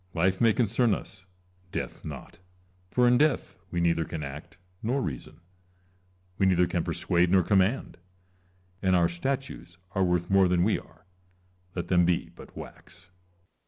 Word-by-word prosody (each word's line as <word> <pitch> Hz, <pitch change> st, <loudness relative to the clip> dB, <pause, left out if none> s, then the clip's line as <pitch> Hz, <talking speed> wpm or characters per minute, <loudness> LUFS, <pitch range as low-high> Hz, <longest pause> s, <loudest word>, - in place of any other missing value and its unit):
Life 95 Hz, +2 st, +1 dB
may 115 Hz, -1 st, +6 dB
concern 115 Hz, -1 st, +2 dB
us, 95 Hz, -1 st, -11 dB, 0.4 s
death -, -, -5 dB
not; 75 Hz, +1 st, -9 dB, 0.5 s
for 125 Hz, +4 st, +3 dB
in 120 Hz, 0 st, +5 dB
death 150 Hz, -2 st, +1 dB
we 85 Hz, -, -2 dB
neither 85 Hz, -1 st, +2 dB
can 80 Hz, 0 st, -5 dB
act 75 Hz, +4 st, -8 dB, 0.2 s
nor 125 Hz, +5 st, 0 dB
reason, 75 Hz, -, -6 dB, 1.0 s
we 95 Hz, -, +4 dB
neither 90 Hz, -1 st, +4 dB
can -, -, -1 dB
persuade 85 Hz, 0 st, +1 dB
nor 95 Hz, 0 st, +4 dB
command; 95 Hz, +3 st, +1 dB, 0.8 s
and 95 Hz, -1 st, +3 dB
our 85 Hz, -1 st, +4 dB
statues 110 Hz, 0 st, -4 dB
are 95 Hz, -1 st, +1 dB
worth 90 Hz, -1 st, +1 dB
more 95 Hz, -1 st, +4 dB
than 90 Hz, -1 st, +2 dB
we 105 Hz, +3 st, +2 dB
are, -, -, -20 dB, 0.7 s
let 85 Hz, -, -4 dB
them 90 Hz, -1 st, +4 dB
be 85 Hz, 0 st, 0 dB
but -, -, -13 dB
wax. 85 Hz, -, -12 dB
90 Hz, 155 wpm, -28 LUFS, 85-105 Hz, 1.0 s, may